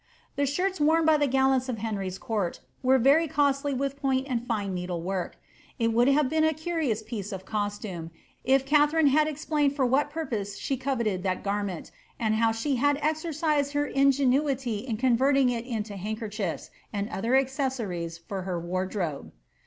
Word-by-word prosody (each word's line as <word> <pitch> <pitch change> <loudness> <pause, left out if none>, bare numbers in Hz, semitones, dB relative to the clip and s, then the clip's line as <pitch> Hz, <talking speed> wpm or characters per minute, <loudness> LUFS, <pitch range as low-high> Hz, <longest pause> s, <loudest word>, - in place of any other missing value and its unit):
The 285 0 +1
shirts 365 +5 -1
worn 320 +2 +4
by 315 -1 +5
the 290 -1 +2
gallants 265 -1 +2
of 240 - -2
Henry's 200 -4 -3
court 205 -6 -2 0.2
were 260 +1 +4
very 280 +6 +4
cosdj 285 -2 +1
with 275 +1 -3
point 265 -1 +1
and 245 -3 -2
fine 205 -5 -1
needle 180 -1 -3
work. 185 +1 -3 0.4
It 230 -2 +1
would 240 +2 +4
have 275 0 +4
been 315 +3 +1
a 315 -1 +2
curious 315 -9 -1
pieee 215 -2 -5
of 190 -1 -6
costume, 205 -5 -3 0.3
if 270 +1 +3
Katharine 300 +2 +4
had 305 +1 +4
explained 295 -1 0
for 270 -3 +2
what 270 +4 +2
purpose 225 -11 -4
she 275 - -2
coveted 235 -8 -1
this 185 -1 0
garment, 200 -3 -3 0.3
and 220 -2 +1
how 225 +1 +3
she 250 +5 -1
had 285 +3 +2
exercised 305 -2 0
her 290 0 +1
ingenuity 270 -3 +2
in 230 -1 -4
converting 260 +2 +3
it 235 0 -4
into 215 -4 -4
handkerchiefs, 210 -2 -4 0.2
and 205 -1 -2
other 220 +5 -3
little 265 +2 +5
accessories 235 - -3
to 195 -2 -3
her 180 -2 -3
wardrobe. 180 -2 -3
255 Hz, 175 wpm, -27 LUFS, 205-285 Hz, 0.4 s, by